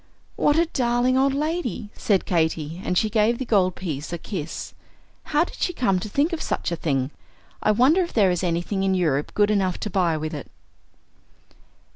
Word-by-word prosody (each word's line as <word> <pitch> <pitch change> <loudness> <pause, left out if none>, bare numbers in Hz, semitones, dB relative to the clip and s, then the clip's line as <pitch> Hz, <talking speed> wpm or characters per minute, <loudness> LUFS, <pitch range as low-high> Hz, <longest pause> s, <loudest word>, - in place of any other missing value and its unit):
"What 295 - +3
a 335 - +4
darling 245 -3 +1
old 270 +1 +3
lady!" 295 - -2
said 200 -3 +1
Katy; 160 -1 -1
and 180 - 0
she 215 - +3
gave 220 +2 +2
the 260 - -4
gold 190 -6 +2
piece 155 -5 -5
a 170 - -2
kiss. 165 -3 -6 0.5
"How 300 +2 +2
did - - -9
she 355 - 0
come 195 - +1
to 210 - -6
think 290 - +1
of 330 - -2
such - - -2
a - - 0
thing? 140 -4 -1 0.5
I - - +1
wonder 255 - +4
if 345 - -2
there 200 -5 +4
is 180 0 -1
anything 175 +3 -1
in 190 0 +2
Europe 150 -6 0
good 205 0 +3
enough 190 -4 +1
to 210 - -3
buy 175 -4 +1
with 155 +1 -4
it?" 145 -4 -7
195 Hz, 195 wpm, -24 LUFS, 170-250 Hz, 0.5 s, a